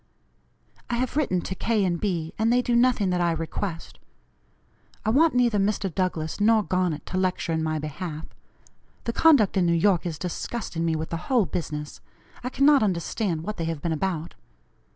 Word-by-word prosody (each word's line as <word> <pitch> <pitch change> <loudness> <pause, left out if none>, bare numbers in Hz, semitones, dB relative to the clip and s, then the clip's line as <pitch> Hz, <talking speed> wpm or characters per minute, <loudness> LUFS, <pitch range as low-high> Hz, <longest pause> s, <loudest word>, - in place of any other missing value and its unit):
I 240 - 0
have 250 +2 -2
written 240 -12 +1
to 190 - -4
K. 215 0 0
and 175 -2 -1
B., 170 -6 -2
and 225 +1 +3
they 250 +1 +3
do 240 - +1
nothing 235 -6 +3
that 180 0 0
I 170 -1 +2
request. 165 +2 -5 1.1
I 220 - +2
want 300 +3 +4
neither 240 -4 +3
Mr. 195 -2 0
Douglass 180 -1 -2
nor 220 0 +4
Garnet 180 -5 -1
to 185 - -2
lecture 185 -2 -1
in 160 - 0
my 155 0 -1
behalf. 155 +1 -5 0.8
The 230 - -2
conduct 260 - +4
in 180 -2 +3
New 170 - +3
York 175 0 +2
is 160 -3 -4
disgusting 180 0 -4
me 165 -1 +1
with 160 0 -4
the 165 - -1
whole 245 -6 +3
business. 150 -4 -5 0.4
I 250 - -2
cannot 280 +2 +4
understand 180 -2 -1
what 210 +4 -5
they 165 - -2
have 165 -3 -4
been 170 -2 0
about. 170 -1 -2
185 Hz, 185 wpm, -25 LUFS, 165-225 Hz, 1.1 s, want